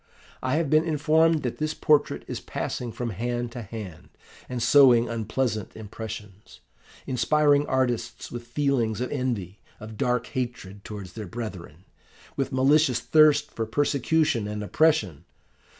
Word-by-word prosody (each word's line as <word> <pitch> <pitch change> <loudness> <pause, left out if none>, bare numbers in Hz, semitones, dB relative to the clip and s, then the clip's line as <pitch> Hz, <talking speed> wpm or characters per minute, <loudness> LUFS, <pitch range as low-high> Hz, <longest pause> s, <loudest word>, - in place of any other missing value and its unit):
I 130 +2 0
have 160 -1 +1
been 155 +2 +4
informed 160 0 +2
that 125 - -3
this 155 +1 -2
portrait 150 -1 +2
is - - -4
passing 120 -2 -4
from 120 0 -4
hand 120 +4 -3
to 120 - -6
hand, 105 -6 -9 0.4
and 125 - -3
sowing 120 -1 +6
unpleasant 110 -1 -2
impressions, 105 -2 -9 0.5
inspiring 145 +3 +2
artists 130 -3 -1
with 120 0 -7
feelings 120 -5 0
of 125 - -3
envy, 115 -9 -3 0.2
of 110 -1 -9
dark 125 +1 0
hatred 120 -7 -5
towards 100 -5 -8
their 110 -3 -7
brethren, 95 -6 -8 0.5
with 135 - -2
malicious 135 0 +3
thirst 155 -2 +4
for 115 -1 -4
persecution 145 -2 +1
and 105 0 -4
oppression. 105 - +1
120 Hz, 135 wpm, -25 LUFS, 110-145 Hz, 0.5 s, sowing